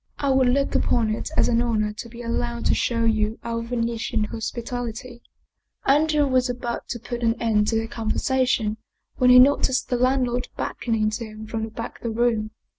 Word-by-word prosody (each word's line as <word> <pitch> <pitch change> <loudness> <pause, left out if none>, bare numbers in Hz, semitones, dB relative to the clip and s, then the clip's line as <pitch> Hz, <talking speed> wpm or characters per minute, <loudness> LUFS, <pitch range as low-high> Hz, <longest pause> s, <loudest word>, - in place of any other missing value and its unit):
" - - -44
I 280 -1 0
would 265 -1 +4
look 275 +2 +1
upon 225 -3 +1
it 220 - -4
as - - +4
an 235 -1 +2
honor 215 -3 0
to 235 +2 -8
be 235 +1 -9
allowed 235 0 -2
to - - +3
show 230 -1 0
you 220 -1 +1
our 230 0 -2
Venetian 230 -1 -2
hospitality 235 +2 -5 0.3
" - - -43
Andrea 300 -1 +2
was 255 -2 +2
about 240 -1 -4
to 240 - -4
put 240 +1 -6
an 230 0 +1
end 215 -2 +2
to 225 - +1
the 225 0 0
conversation 225 -1 0 0.4
when 250 - +4
he 250 - +9
noticed 260 0 +4
the 245 - +1
landlord 250 -1 +1
beckoning 220 -2 -1
to 230 +2 -4
him 215 0 -9
from 220 0 -3
the - - -8
back 230 +1 -7
of - - -30
the 235 - -1
room. 225 -3 +1
235 Hz, 200 wpm, -24 LUFS, 225-250 Hz, 0.4 s, he